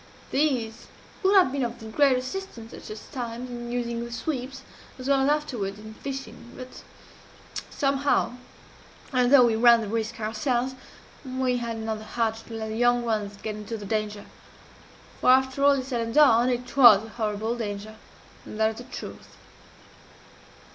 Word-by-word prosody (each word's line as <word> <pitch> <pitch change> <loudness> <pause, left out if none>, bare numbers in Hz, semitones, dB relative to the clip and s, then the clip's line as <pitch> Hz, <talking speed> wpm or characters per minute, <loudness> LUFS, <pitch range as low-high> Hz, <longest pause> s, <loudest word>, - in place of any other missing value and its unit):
These 250 -6 0 0.3
would 390 0 +3
have 365 -9 +6
been 275 -1 -1
of 230 -2 -5
great 280 -3 +5
assistance 255 - -6
at - - -9
such 215 0 -10
times, 245 -2 -5
in 240 0 -6
using 235 -1 -2
the 235 - -7
sweeps, 265 0 -4 0.3
as 255 0 -7
well 275 -1 +4
as 270 - +3
afterward 245 -10 -1
in 215 +1 -10
fishing 270 -1 -7
but, 255 0 -9 0.9
somehow, 275 -2 +1 0.8
although 250 +1 +6
we 230 -2 +2
ran 235 0 +6
the 215 - -4
risk 225 +2 -3
ourselves, 240 +4 -1 0.5
we 255 -1 -1
had 235 -1 -3
not 220 -1 -3
the - - -10
heart 225 0 -1
to 230 - -9
let 220 -1 -4
the 220 - -4
young 240 0 +3
ones 210 -3 -2
get 215 -1 -3
into 215 +2 -6
the 205 - -8
danger 210 -1 -2 0.9
for, - - +2
after 260 +1 +4
all 280 -1 +5
said 250 -3 -2
and 230 0 -4
done, 255 -5 +6
it 250 0 -3
was 235 -7 +8
a 225 - -10
horrible 220 0 -2
danger, 215 -2 -5 0.5
and 215 - -9
that 220 0 +3
is 220 - -11
the - - -19
truth. - - -9
240 Hz, 170 wpm, -26 LUFS, 220-260 Hz, 0.9 s, was